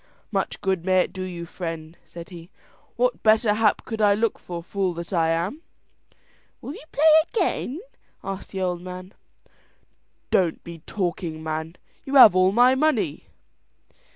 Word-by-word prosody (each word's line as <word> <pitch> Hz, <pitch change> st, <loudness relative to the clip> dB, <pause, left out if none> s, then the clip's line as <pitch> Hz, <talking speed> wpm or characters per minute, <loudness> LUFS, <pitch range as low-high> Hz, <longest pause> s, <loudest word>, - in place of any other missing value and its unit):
"Much -, -, -2 dB
good 190 Hz, -4 st, -1 dB
may 185 Hz, 0 st, +3 dB
it -, -, -3 dB
do 185 Hz, -, -6 dB
you, 175 Hz, -2 st, -5 dB
friend," 165 Hz, -2 st, -7 dB
said 170 Hz, -1 st, -11 dB
he. 170 Hz, -2 st, -11 dB, 0.5 s
"What -, -, 0 dB
better 220 Hz, 0 st, +4 dB
hap 210 Hz, -1 st, +1 dB
could 220 Hz, -1 st, -4 dB
I 205 Hz, -1 st, +5 dB
look 225 Hz, +1 st, -1 dB
for, 170 Hz, -1 st, -7 dB
fool 190 Hz, -1 st, -2 dB
that 170 Hz, +3 st, -7 dB
I 165 Hz, -2 st, +2 dB
am!" 170 Hz, -, -2 dB, 1.0 s
"Will 280 Hz, -, -7 dB
you -, -, -11 dB
play 295 Hz, -, -1 dB, 0.3 s
again?" 325 Hz, -, -1 dB, 0.4 s
asked 195 Hz, 0 st, -6 dB
the 190 Hz, -, -5 dB
old 180 Hz, -1 st, -1 dB
man. 185 Hz, +1 st, -9 dB, 1.2 s
"Don't 175 Hz, -4 st, +1 dB
be 170 Hz, -1 st, -9 dB
talking, 170 Hz, -4 st, -3 dB
man: 160 Hz, +1 st, -4 dB, 0.3 s
you 275 Hz, -, -4 dB
have 225 Hz, -8 st, +9 dB
all 185 Hz, 0 st, +4 dB
my 245 Hz, +4 st, +5 dB
money." 305 Hz, +3 st, 0 dB
185 Hz, 155 wpm, -24 LUFS, 170-215 Hz, 1.2 s, have